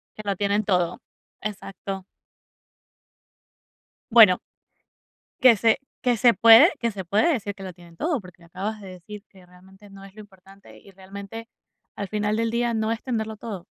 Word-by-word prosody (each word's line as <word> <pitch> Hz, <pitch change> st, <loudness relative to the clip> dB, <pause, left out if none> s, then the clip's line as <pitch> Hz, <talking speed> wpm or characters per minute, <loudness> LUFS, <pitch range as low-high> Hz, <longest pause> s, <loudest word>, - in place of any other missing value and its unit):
Que 215 Hz, -, -8 dB
lo 200 Hz, -1 st, -1 dB
tienen 205 Hz, +2 st, 0 dB
todo, 180 Hz, -3 st, -1 dB, 0.4 s
exacto. 195 Hz, -2 st, -7 dB, 2.1 s
Bueno. 215 Hz, -6 st, +7 dB, 1.0 s
Que 250 Hz, -3 st, +7 dB
se 225 Hz, +5 st, +2 dB, 0.2 s
que 245 Hz, -2 st, +2 dB
se 240 Hz, 0 st, +5 dB
puede 230 Hz, +9 st, +8 dB
que 235 Hz, -1 st, -1 dB
se 195 Hz, -2 st, -7 dB
puede 215 Hz, -, +2 dB
decir 205 Hz, -5 st, -4 dB
que 195 Hz, -, -11 dB
lo 185 Hz, -2 st, -7 dB
tienen 170 Hz, -1 st, -18 dB
todo, 310 Hz, -8 st, -1 dB
porque 180 Hz, -1 st, -15 dB
me -, -, -16 dB
acabas 205 Hz, +5 st, -5 dB
de 195 Hz, -, -11 dB
decir 200 Hz, +3 st, -11 dB
que 190 Hz, -2 st, -19 dB
realmente 190 Hz, +3 st, -19 dB
no 195 Hz, 0 st, -14 dB
es 195 Hz, -1 st, -14 dB
lo 215 Hz, -, -10 dB
importante, 195 Hz, -1 st, -18 dB
y -, -, -19 dB
realmente, 200 Hz, +4 st, -10 dB, 0.5 s
al 200 Hz, -1 st, -5 dB
final 210 Hz, 0 st, -1 dB
del 230 Hz, 0 st, 0 dB
día, 235 Hz, 0 st, 0 dB
no 220 Hz, 0 st, -1 dB
es 225 Hz, -, -3 dB
tenerlo 220 Hz, -4 st, -3 dB
todo. 200 Hz, -5 st, -8 dB
205 Hz, 175 wpm, -24 LUFS, 190-225 Hz, 2.1 s, puede